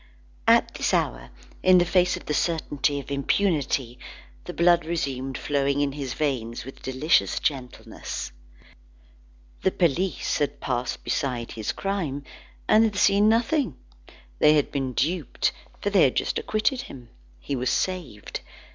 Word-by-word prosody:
At - - +5
this - - 0
hour, - - -1 0.3
in 185 0 +6
the 175 - +4
face 180 +1 +2
of - - -12
the 150 - -2
certainty 145 -3 0
of 140 - -9
impunity, 140 -5 0 0.5
the - - -5
blood 170 0 +4
resumed 135 -5 -3
flowing 140 -1 0
in 145 -1 +1
his 135 -2 -5
veins 120 -7 -2
with 135 - -11
delicious 130 +5 +2
gentleness. 130 -4 -4 1.3
The - - +3
police 180 0 0
had 145 -1 -1
passed 125 -1 -2
beside 125 -4 -2
his 110 -2 -3
crime, 170 -9 -3 0.4
and 215 +1 +6
had 215 -2 +1
seen 205 +1 +4
nothing. 230 - +1 0.6
They 150 - +6
had 150 -2 +2
been 135 -3 -2
duped, 160 +3 0 0.3
for 205 - 0
they 195 -3 +5
had 130 - +4
just - - 0
acquitted 220 +4 0
him. 125 - -11 0.3
He 140 - -3
was 125 0 -1
saved. 170 - -2
145 Hz, 145 wpm, -25 LUFS, 130-180 Hz, 1.3 s, in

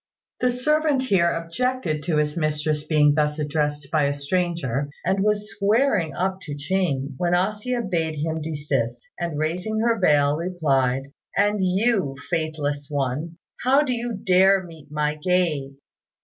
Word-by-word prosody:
The 250 - +2
servant 295 +2 +1
here 190 -8 +3
objected 165 -1 -2
to 160 -3 +1
his 150 0 0
mistress 155 -1 -1
being 150 -2 +4
thus 150 0 +1
addressed 150 -1 -2
by 155 -3 +3
a 140 0 0
stranger, 145 -4 -1 0.2
and 195 - +1
was 210 +1 0
squaring 200 - +1
up 190 +1 -1
to 150 -5 -6
Ching, 145 -4 -1
when 175 +2 +1
A 185 +4 +2
hsia 240 +3 -3
bade 165 -4 -1
him 160 +2 -2
desist; 140 -6 -2
and, 170 -3 -3
raising 180 +8 -1
her 230 -1 +2
veil, 145 -4 +3
replied, 140 -6 0 0.3
"And 205 0 +2
you, 190 - +1 0.2
faithless 150 -3 -2
one, 145 +4 -2 0.3
how 270 +4 +4
do 260 -4 -1
you 240 0 -3
dare 190 -1 +4
meet 160 -4 -13
my 150 0 -1
gaze?" 150 -6 0
165 Hz, 150 wpm, -24 LUFS, 150-195 Hz, 0.3 s, being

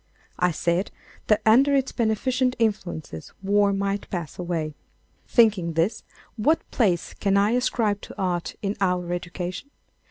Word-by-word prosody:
I 180 - +3
said 170 +3 0 0.4
that 215 0 +3
under 265 +6 +5
its 270 -1 +1
beneficent 250 +3 0
influences 175 - -3
war 200 +1 +3
might 200 0 -2
pass 170 -3 -5
away. 165 -4 -2 0.5
Thinking 210 -8 +3
this, 165 +7 0 0.3
what 310 +9 +2
place 185 -8 +1
can 200 -1 +1
I 205 +2 +3
ascribe 230 -4 +1
to - - -11
art 180 -3 -1
in 200 +1 -1
our 180 -2 0
education? 175 +7 -5
200 Hz, 135 wpm, -24 LUFS, 175-225 Hz, 0.5 s, under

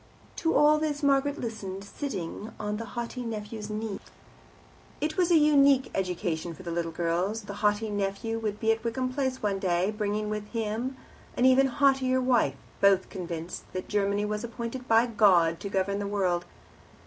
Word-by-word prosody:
To 325 - +1
all 300 +1 +5
this 300 -1 -2
Margaret 280 +1 +2
listened, 200 -4 -5
sitting 200 - -5
on 210 0 -2
the 230 - -5
haughty 240 +1 -3
nephew's 215 -2 -5
knee. 215 -1 -4 1.0
It 305 +1 -1
was 360 -2 +2
a 340 - +6
unique 280 -3 +5
education 175 -3 -2
for 185 - -12
the 170 - -5
little 165 0 -2
girls. 175 +6 -1
The 205 - -7
haughty 210 +1 +1
nephew 205 +3 -2
would 210 -2 -3
be 225 -1 +3
at 225 0 -1
Wickham 255 +2 -2
Place 260 -3 -2
one 200 -2 0
day, 185 +1 +1
bringing 210 0 -2
with 210 0 -3
him 230 +4 -2 0.4
an 250 - +3
even 260 +1 +6
haughtier 265 -1 +2
wife, 245 - +2 0.2
both 195 -1 +4
convinced 170 -2 -6
that 185 - -4
Germany 205 0 +1
was 210 +1 -3
appointed 235 +2 -5
by 225 +1 +5
God 185 -8 +4
to 200 - -5
govern 195 +1 0
the 200 - -2
world. 185 -4 0
215 Hz, 170 wpm, -28 LUFS, 195-255 Hz, 1.0 s, a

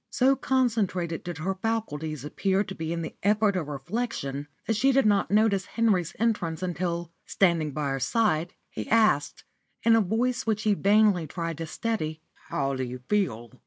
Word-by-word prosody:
So 265 +2 +3
concentrated 215 -12 0
did 175 -3 -5
her 180 +4 -1
faculties 160 - -3
appear 195 +6 0
to 195 - -7
be 160 -3 -4
in 170 0 -2
the - - -6
effort 205 0 +3
of 170 -5 -2
reflection 145 - -4 0.2
that 225 - 0
she 265 +6 +3
did 270 -2 +3
not 205 -2 +3
notice 205 -2 +2
Henry's 195 -7 +1
entrance 185 -7 0
until, 175 -1 -2 0.2
standing 170 -5 +2
by 145 0 -2
her 135 -1 -2 0.2
aide, 180 -6 +1 0.2
he - - -6
asked, 215 -11 +2 0.4
in 225 0 +6
a 225 - +5
voice 235 +5 0
which 215 -1 0
he 215 - +3
vainly 200 -4 +3
tried 165 0 -4
to 165 - -4
steady 160 -6 -3 0.3
"How 140 -1 -1
do 130 -1 -2
you 125 0 -6
feel 125 - 0
185 Hz, 175 wpm, -27 LUFS, 160-220 Hz, 0.4 s, in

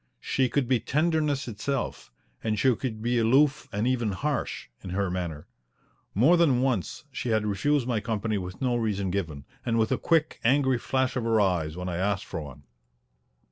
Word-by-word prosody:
She 130 -2 +1
could 140 -2 0
be 130 -1 +3
tenderness 150 -1 0
itself, 115 - -3 0.3
and 110 -1 0
she 125 +4 +3
could 110 -2 -4
be 120 0 +2
aloof 135 +6 +3
and 105 +3 -1
even 120 -5 +1
harsh 145 +8 -2 0.2
in 95 - -6
her 95 0 -1
manner. 85 -5 -4 0.7
More 140 - +5
than 135 -7 +3
once 120 -10 -1
she 125 - -4
had 110 -1 +2
refused 135 +7 +1
my 120 -4 +1
company 110 -1 -1
with 90 +3 -7
no 125 -2 +1
reason 100 -5 -1
given, 80 -7 -3 0.2
and 115 -1 0
with 110 -1 +2
a - - +1
quick, 160 -2 +1
angry 130 0 +3
flash 130 0 0
of 125 - -1
her 115 -1 +2
eyes 90 -5 +1
when 90 0 -4
I 85 -2 -2
asked 95 +1 0
for 80 - -5
one. 70 -1 -10
115 Hz, 185 wpm, -27 LUFS, 95-130 Hz, 0.7 s, More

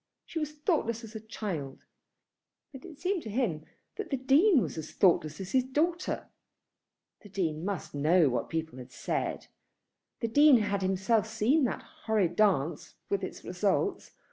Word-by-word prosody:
She 330 - -4
was 300 -1 -3
thoughtless 295 - -1
as 225 0 -10
a 220 - -5
child; 190 -11 -6 0.9
but 270 - -10
it 330 -5 -11
seemed 370 +1 -1
to 220 - -7
him 200 -10 -1 0.3
that 420 -4 -5
the 275 - 0
Dean 280 - +5
was - - -2
as 155 - -7
thoughtless 155 -5 +2
as 190 -1 -6
his 260 -1 +3
daughter. 325 +7 -1 0.9
The 205 - -14
Dean 165 -5 -2
must 195 -2 -4
know 155 +3 +4
what 125 -2 -1
people 160 -5 -4
had 125 0 -10
said. - - -3 0.7
The 230 - -1
Dean 290 +3 +6
had 205 -2 0
himself 190 +4 +1
seen 225 +7 +2
that - - -3 0.2
horrid 200 -6 +1
dance, 175 -7 +1 0.2
with 400 - 0
its - - -6
results. - - -1
220 Hz, 165 wpm, -30 LUFS, 175-275 Hz, 0.9 s, Dean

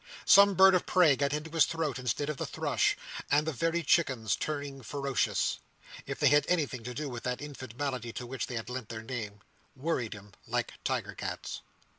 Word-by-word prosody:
Some 200 0 +7
bird 190 +1 +8
of 180 - +1
prey 175 -6 +5
got 140 +1 0
into 150 +2 -3
his 165 -2 +5
throat 155 -6 -2
instead 125 +3 -1
of 150 -2 -3
the - - -2
thrush; - - +1 0.3
and 150 +1 +3
the 160 - -1
very 165 +5 0
chickens 130 - +2
turning 145 -3 -4
ferocious—if 140 +2 -3
they - - +5
have 145 0 +4
anything 145 -9 0
to 125 0 -5
do 150 +3 -3
with 120 -3 -6
that 125 0 -2
infant 130 -5 -8
malady 130 -5 -2
to 125 - -5
which 130 +2 -4
they 120 -2 -3
lend 125 0 -6
their 110 -1 -7
name—worried 120 +4 -5
him 105 -1 -12 0.2
like - - -1
tiger - - -2
cats. - - -5
140 Hz, 185 wpm, -30 LUFS, 125-155 Hz, 0.3 s, bird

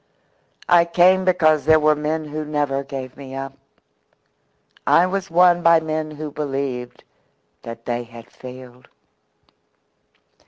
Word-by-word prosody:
I 175 -1 +6
came 180 +2 +3
because 155 -5 +3
there 155 0 +5
were 155 0 +4
men 155 +1 -3
who 155 +1 -5
never 145 -2 -2
gave 130 -2 -7
me 135 -1 -10
up. 135 0 -6 1.3
I 175 - +5
was 195 +1 -3
won 175 +1 +4
by 170 -1 +5
men 155 -1 -3
who 155 0 -7
believed 135 -4 -4 0.6
that 115 0 -9
they 120 0 -2
had 115 0 -13
failed." 125 -1 -12
150 Hz, 125 wpm, -21 LUFS, 130-165 Hz, 1.3 s, I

